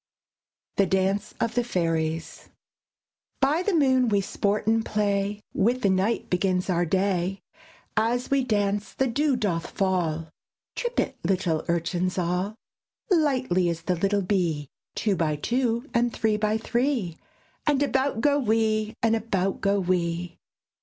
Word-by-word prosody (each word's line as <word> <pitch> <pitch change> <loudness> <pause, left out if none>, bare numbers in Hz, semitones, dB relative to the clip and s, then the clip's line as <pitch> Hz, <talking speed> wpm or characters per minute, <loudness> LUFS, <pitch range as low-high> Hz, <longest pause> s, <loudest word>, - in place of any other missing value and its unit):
THE 195 - +4
DANCE 190 +2 0
OF 230 -1 0
THE 245 - +1
FAIRIES 165 -6 -2 0.9
By 285 +5 +2
the 370 0 0
moon 260 -5 +3
we 205 -2 +3
sport 200 +2 -1
and 225 +1 +2
play, 205 -1 -1
With 245 +5 +1
the 200 - +4
night 210 +5 0
begins 185 -1 0
our 175 0 +2
day; 190 +1 0 0.5
As 235 +4 0
we 275 -1 +3
dance, 205 -3 0
the 265 - +2
dew 275 +3 +1
doth 185 -8 -1
fall 170 -5 -1 0.5
Trip 485 0 -2
it, - - -1
little 180 -5 0
Urchins 175 +2 -1
all, 180 +4 -1 0.6
Lightly 255 - +2
as 165 -1 -4
the 180 - 0
little 195 +3 +1
bee, 170 -7 0 0.3
Two 205 -3 +1
by 155 -4 0
two, 235 - -1
and 240 0 +2
three 220 -2 +1
by 210 +1 +1
three; 235 - -1 0.5
And 290 -1 +3
about 270 -3 0
go 285 +2 +3
we! 220 -2 +1
And 225 0 +4
about 195 -4 -1
go 200 +1 +2
we! 175 -2 -1
205 Hz, 145 wpm, -26 LUFS, 180-235 Hz, 0.9 s, THE